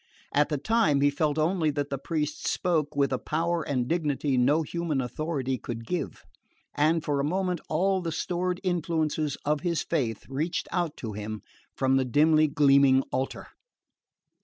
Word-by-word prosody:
At 145 +1 +3
the 150 - 0
time 175 -4 +2
he 145 0 +4
felt 150 +1 0
only 160 0 +2
that 145 -1 -2
the 140 - -2
priest 150 +1 -3
spoke 155 -5 0
with 140 -1 +2
a 130 - 0
power 170 +2 -1
and 130 -5 -1
dignity 150 -4 0
no 140 +6 +3
human 165 -2 -2
authority 130 0 -2
could 115 -1 -6
give; 180 +7 -4 0.5
and 155 +2 +2
for 145 -1 0
a - - +1
moment 180 +2 -1
all 190 +4 +1
the 170 -2 -3
stored 180 +2 -2
influences 160 -4 -1
of 150 0 +1
his 170 -3 0
faith 115 -6 -2
reached 150 +6 -2
out 175 -4 -1
to 110 -3 -5
him 105 +1 -6 0.3
from 135 0 +3
the 130 - +1
dimly 155 +4 +4
gleaming 140 -2 +5
altar. 130 +1 -3
150 Hz, 165 wpm, -27 LUFS, 135-165 Hz, 0.5 s, gleaming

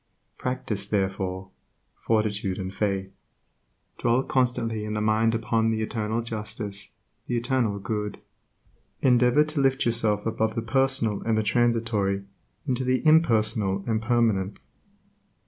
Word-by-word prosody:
Practice, 110 -6 -3
therefore, 95 -2 -2 0.4
fortitude 105 -4 -1
and 95 0 -5
faith. 95 -2 -1 0.9
Dwell 120 +3 +2
constantly 115 -5 0
in 105 0 -4
mind 110 +1 +2
upon 115 0 +1
the 110 -1 0
Eternal 110 +1 -2
justice, 105 -2 -4 0.3
the 120 - 0
Eternal 120 -4 0
Good. 105 +1 -3 0.9
Endeavor 125 +2 +5
to 155 -1 -2
lift 135 0 +2
yourself 110 -3 +2
above 110 -1 -1
the 115 - -2
personal 130 -4 +1
and 115 -1 0
the 110 - +1
transitory 110 -3 +1 0.4
into 130 -1 0
the 130 +3 0
impersonal 110 -10 +3
and 110 -2 0
permanent. 110 -4 +1
110 Hz, 120 wpm, -26 LUFS, 105-120 Hz, 0.9 s, Endeavor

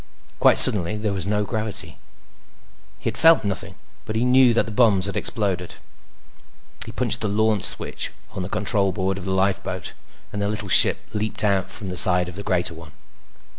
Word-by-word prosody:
Quite - - +4
suddenly, 100 +1 +6
there 105 -1 -2
was 95 0 -2
no 105 0 0
gravity. 110 0 -5 1.0
He - - -7
had - - -7
felt 165 -4 +6
nothing, 100 -2 -5 0.3
but 110 - -6
he 115 +2 0
knew 125 0 +5
that - - +2
the 110 - -8
bombs 105 -4 +3
had 100 - -3
exploded. 95 -5 -3 1.1
He - - -6
punched - - -1
the 110 - -1
LAUNCH 105 -1 0
switch - - -3 0.2
on - - -6
the 90 - -5
control 100 -2 0
board 95 +1 -3
of 95 - -9
the 95 - -3
lifeboat, 95 0 -2 0.4
and 105 - -4
the 100 - -1
little 105 -1 -4
ship - - +5
leaped 110 0 -3
out 100 -3 0
from 100 - -5
the 90 - -4
side 90 0 +3
of 90 - -9
the 100 - -6
greater 90 -4 -1
one. 80 -1 -13
100 Hz, 190 wpm, -22 LUFS, 95-110 Hz, 1.1 s, suddenly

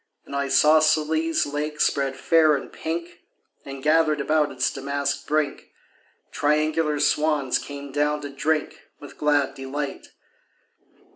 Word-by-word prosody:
An - - -11
isosceles 155 +3 +3
lake 150 +1 -4
spread 135 -3 +1
fair 155 +2 +4
and 135 - -7
pink, 170 +1 -5 0.4
And, 135 -1 -9
gathered 155 0 +3
about 150 +1 +1
its - - -1
damask 140 +1 -3
brink, 150 -1 -1 0.6
Triangular 150 0 +1
swans 150 -3 +1
came 140 -1 -8
down 150 +1 0
to 145 -1 -7
drink 155 +2 -2
With 145 - -13
glad 145 -2 +2
delight. 140 +1 -5
150 Hz, 120 wpm, -24 LUFS, 140-155 Hz, 0.6 s, fair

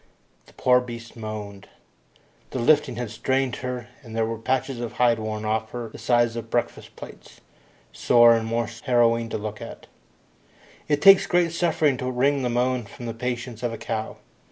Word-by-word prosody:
The - - -19
poor 125 -1 +3
beast 120 -1 -9
moaned. 105 -3 -7 0.8
The - - -5
lifting 125 +1 +3
had 120 -2 -5
strained 130 +2 -1
her, 125 -2 -5
and 115 -5 -10
there 115 0 +1
were 115 0 -4
patches 130 +1 -1
of 120 -1 -5
hide 120 -2 +2
worn 110 0 -4
off 110 +1 -1
her 120 -2 -5
the - - -12
size 120 -1 +2
of 115 -1 -6
breakfast 120 - -3
plates, - - -12 0.5
sore 120 -1 +5
and 115 -1 -2
most 115 0 -3
harrowing 115 -2 +2
to - - -3
look 105 -1 -6
upon. - - -8 1.1
It 145 -1 0
takes 195 -1 +8
great 175 -2 +2
suffering 160 -5 +1
to 125 0 -3
wring 135 +2 +1
a 125 - 0
moan 125 0 0
from 120 - -10
the 115 - -4
patience 120 -1 -4
of 120 -2 -2
a - - -5
cow. 110 0 -4
120 Hz, 180 wpm, -24 LUFS, 115-125 Hz, 1.1 s, takes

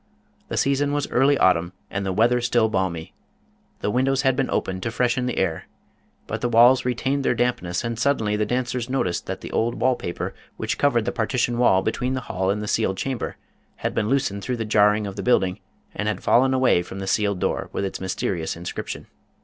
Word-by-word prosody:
The - - -4
season 140 +1 +1
was 145 -1 -1
early 135 +3 +4
autumn 90 -3 +3 0.2
and 100 0 -2
the 95 - -1
weather 120 +5 +3
still 120 -2 +2
balmy. 95 -5 -2 0.7
The 105 - 0
windows 135 +3 +1
had 135 -2 +3
been 135 0 0
opened 95 0 -2
to 115 - -2
freshen 125 +1 0
the 125 - -3
air. 85 -4 -1 0.6
But - - -4
the 120 - 0
walls 120 +3 +6
retained 130 +3 0
their 125 - +2
dampness 115 -8 -1
and 115 -1 -3
suddenly 110 -6 +1
the 105 - +1
dancers 125 0 -2
noticed 110 -10 -1
that - - -4
the - - -7
old 120 +1 0
wall 125 +4 +2
paper 85 - -4 0.2
which - - -2
covered 120 -6 +2
the 120 - 0
partition 120 0 0
wall 95 -6 +4
between 125 +4 -1
the 130 - -2
hall 95 -5 -2
and 105 +2 0
the - - -5
sealed 100 -3 0
chamber 130 +1 -3 0.4
had - - -3
been 105 - 0
loosened 120 -7 0
through 125 +4 -2
the 115 - -3
jarring 105 0 +3
of 100 -1 -6
the - - -2
building, 95 -7 +2 0.3
and 105 - -3
had 105 - -2
fallen 130 +2 +4
away 130 -9 +3
from 90 +2 -8
the 95 - -4
sealed 100 0 +1
door - - -2
with 100 - -2
its 95 - -5
mysterious 90 -3 -2
inscription. 85 +1 -6
115 Hz, 210 wpm, -23 LUFS, 95-125 Hz, 0.7 s, walls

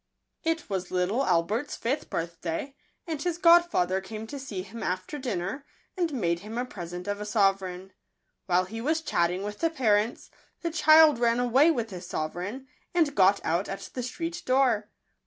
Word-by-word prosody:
*T 325 0 +1
was 190 -3 -3
little 185 +8 0
Albert's 195 +9 0
fifth 265 +6 -2
birthday; 170 +9 -4 0.3
and 320 -5 -4
his 350 0 -1
godfather 335 - +4
came 215 +3 -7
to 280 +5 -7
see 210 -9 -5
him 220 +4 -9
after 185 +11 -3
dinner, 235 +1 -3 0.3
and 345 -4 0
made 170 -10 0
him 215 +5 -7
a 245 - -1
pre 180 -8 -7
sent 180 +2 -7
of 205 0 -2
a - - -2
sovereign. 195 -3 0 0.5
While 180 0 +3
he 225 +4 -6
was 315 +5 0
chatting 180 - 0
with 205 0 -5
the 330 - +2
parents, 225 -7 0 0.3
the 335 - -2
child 310 -3 +6
ran 235 0 +2
away 250 +6 +4
with 235 -8 -1
his 180 -1 -7
sovereign, 180 +13 -4 0.3
and 320 -5 +3
got 195 -1 +4
out 170 +4 0
at 195 - -6
the 255 - -3
street 330 +8 -4
door. 255 -6 +2
220 Hz, 175 wpm, -27 LUFS, 185-280 Hz, 0.5 s, child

